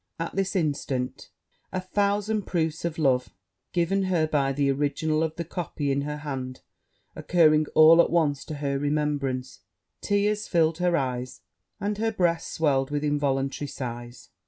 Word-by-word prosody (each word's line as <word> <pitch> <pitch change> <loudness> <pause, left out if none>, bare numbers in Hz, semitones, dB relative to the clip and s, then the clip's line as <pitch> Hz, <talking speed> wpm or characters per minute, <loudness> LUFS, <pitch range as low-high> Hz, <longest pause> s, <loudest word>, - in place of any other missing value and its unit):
At 165 0 -4
this 195 +1 -1
instant, 140 -6 -2 0.4
a 185 - -2
thousand 205 +2 0
proofs 160 -2 -1
of 170 -2 -3
love 130 -5 +1 0.4
given 190 +3 +1
her 175 -4 +2
by 140 -3 +1
the 140 0 +1
original 150 +3 0
of 160 -1 -1
the 170 - -3
copy 160 -4 -3
in 140 +1 0
her 150 +1 -4
hand, 130 -4 -5 0.5
occurring 155 -3 +3
all 160 +2 +8
at - - +1
once 150 -5 +1
to 155 - -6
her 140 -1 -2
remembrance, 145 -3 -1 0.4
tears 205 +1 0
filled 165 -1 +2
her 175 -1 +2
eyes, 125 -2 -3 0.4
and 205 +1 -2
her 225 0 +1
breast 175 -5 0
swelled 135 -4 +1
with 145 0 -2
involuntary 145 -1 0
sighs. 120 -2 -7
155 Hz, 155 wpm, -26 LUFS, 140-175 Hz, 0.5 s, all